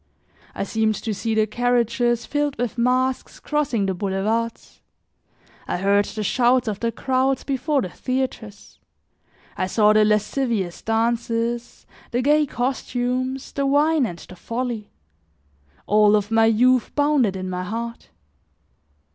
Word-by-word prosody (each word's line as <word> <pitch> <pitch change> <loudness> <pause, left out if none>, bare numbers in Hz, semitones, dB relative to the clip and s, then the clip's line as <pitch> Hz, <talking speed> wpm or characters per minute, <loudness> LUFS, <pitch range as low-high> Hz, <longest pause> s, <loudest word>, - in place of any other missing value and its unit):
I - - -2
seemed 220 +1 0
to 220 - -3
see 225 +2 -2
the 215 -1 +3
carriages 240 0 +1
filled 290 -1 -1
with 245 0 -2
masks 255 +2 0
crossing 275 -9 -1
the 190 - 0
boulevards. 205 +5 -2 0.9
I - - -1
heard 200 +2 +2
the 215 - -5
shouts 245 +3 +2
of 210 -2 -2
the 230 0 -1
crowds 260 +2 0
before 275 0 0
the 185 - -4
theaters; 255 -3 -5 0.8
I 185 - -1
saw 210 +2 +4
the 215 0 +5
lascivious 210 -2 0
dances, 230 +1 -1 0.2
the 245 +1 -1
gay 300 +2 +3
costumes, 255 +1 -2
the 280 -1 -1
wine 295 0 +3
and 175 - -7
the 185 - -12
folly; 230 +2 -4 1.0
all 210 0 +4
of 205 +1 -1
my 225 0 +4
youth 245 +3 +3
bounded 285 -9 +2
in 185 0 -4
my 180 0 -3
heart. 230 +4 -5
235 Hz, 135 wpm, -22 LUFS, 210-255 Hz, 1.0 s, the